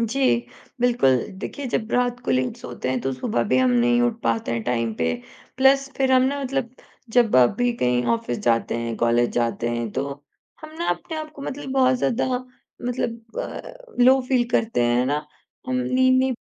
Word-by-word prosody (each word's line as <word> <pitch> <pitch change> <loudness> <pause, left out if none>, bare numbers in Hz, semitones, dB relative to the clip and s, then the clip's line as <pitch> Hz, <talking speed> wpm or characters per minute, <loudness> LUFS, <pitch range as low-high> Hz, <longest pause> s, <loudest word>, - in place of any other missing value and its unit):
जी, 230 +4 -1 0.6
बिल्कुल। 240 - +4 0.3
देखिए 285 -2 -5
जब 220 0 -2
रात 245 0 +1
को - - -1
लेट 130 0 0
सोते 125 +1 -6
हैं 130 - -1
तो 135 +1 -2
सुबह 225 - -1
भी - - +5
हम 255 -1 +3
नहीं 240 0 +3
उठ 235 -1 0
पाते 115 0 0
हैं 115 -1 -2
टाइम 115 -2 -1
पे। 80 -4 0 0.4
प्लस 270 +1 +4
फिर 265 -1 +2
हम 255 - +6
ना 280 +2 0
मतलब 260 -2 -3 0.4
जब 235 - +5
आप 125 -1 +6
भी 245 0 +2
कहीं 125 0 +2
ऑफिस 120 +1 -3
जाते 115 -1 +2
हैं, 115 -1 -3
कॉलेज 120 +1 +2
जाते 120 0 -1
हैं 120 -2 -2
तो, 135 +2 -2 0.5
हम 310 0 -11
ना 340 - -2
अपने 175 - -4
आप 310 0 -6
को 285 - -10
मतलब 275 0 -5
बहुत 260 -1 +4
ज़्यादा 250 0 0 0.6
मतलब 230 -2 -4
अ, - - -8
लो 260 +1 +6
फ़ील 255 -2 +3
करते 225 - +1
हैं, 120 0 +2
है 125 - +2
ना? 145 +3 -1 0.4
हम 255 0 -1
नींद 255 0 +3
नहीं 260 0 +2
235 Hz, 195 wpm, -23 LUFS, -, 0.6 s, हम